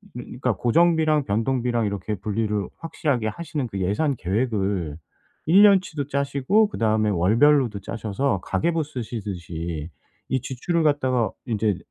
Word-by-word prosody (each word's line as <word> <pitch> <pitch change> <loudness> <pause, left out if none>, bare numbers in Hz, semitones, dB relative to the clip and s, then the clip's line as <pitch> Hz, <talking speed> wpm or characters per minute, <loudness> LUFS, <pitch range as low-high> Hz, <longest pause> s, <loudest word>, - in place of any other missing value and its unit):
그러니까 125 0 -2
고정비랑 155 +3 +3
변동비랑 120 +1 0
이렇게 100 +1 -3
분리를 105 0 -2
확실하게 145 -8 -1
하시는 145 +1 -4
그 100 -3 -5
예산 135 - 0
계획을 95 - -1 0.5
1 185 +6 +6
년 200 -2 +7
치도 150 -6 -5
짜시고 140 +9 +2
그다음에 110 - +1
월별로도 115 - +3
짜셔서 110 +2 -2
가계부 165 -1 0
쓰시듯이 90 - -5 0.4
이 130 - 0
지출을 135 +7 -1
갖다가 130 -6 +1
인제 110 -5 0
120 Hz, 325 characters per minute, -24 LUFS, 105-145 Hz, 0.5 s, 년